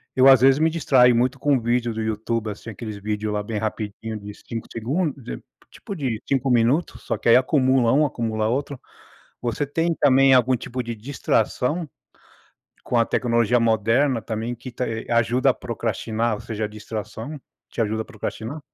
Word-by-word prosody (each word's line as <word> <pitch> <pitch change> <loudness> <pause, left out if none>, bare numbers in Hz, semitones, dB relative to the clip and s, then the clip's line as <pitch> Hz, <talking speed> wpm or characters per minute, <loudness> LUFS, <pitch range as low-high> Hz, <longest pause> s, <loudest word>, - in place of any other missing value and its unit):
eu 130 +1 +6
às 130 -3 +8
vezes 135 +2 +5
me 160 +1 +3
distraio 130 -6 +4
muito 125 +3 +1
com 140 -2 +2
vídeo 120 0 0
do 110 - -3
YouTube, 110 0 -2
assim. 105 +3 -9
aqueles 110 0 -7
vídeos 105 +1 -3
lá 105 - -1
bem 105 +1 -4
rapidinho 110 0 -4
de 100 0 -9
5 115 +1 -7
segundos 140 +4 -2
de - - -7 0.3
tipo 200 - -8
de 125 -8 -3
5 135 -1 +1
minutos. 125 +8 +1
Só - - -2
que - - 0
aí - - +8
acumula 130 -2 +3
um, 150 +2 +4
acumula 110 -5 -1
outro. 135 +3 -2 0.6
Você 120 +4 -1
tem 165 +4 0
também 135 0 +6
algum 130 0 +4
tipo 125 +2 -5
de 115 0 -5
distração 130 +5 -1 1.0
com 125 - -2
a 115 - +5
tecnologia 120 0 +1
moderna 115 +3 +2
também 115 +2 -3
que 125 +2 -9
tá, 125 0 -3
eh, 115 0 -4
ajuda 120 +3 +3
a - - 0
procrastinar, 115 -1 -2
ou 105 - -7
seja, 110 -2 -4
a - - 0
distração 110 +6 -7 0.3
te - - -5
ajuda 110 0 0
a - - -14
procrastinar? 120 +4 -6
120 Hz, 185 wpm, -23 LUFS, 110-130 Hz, 1.0 s, às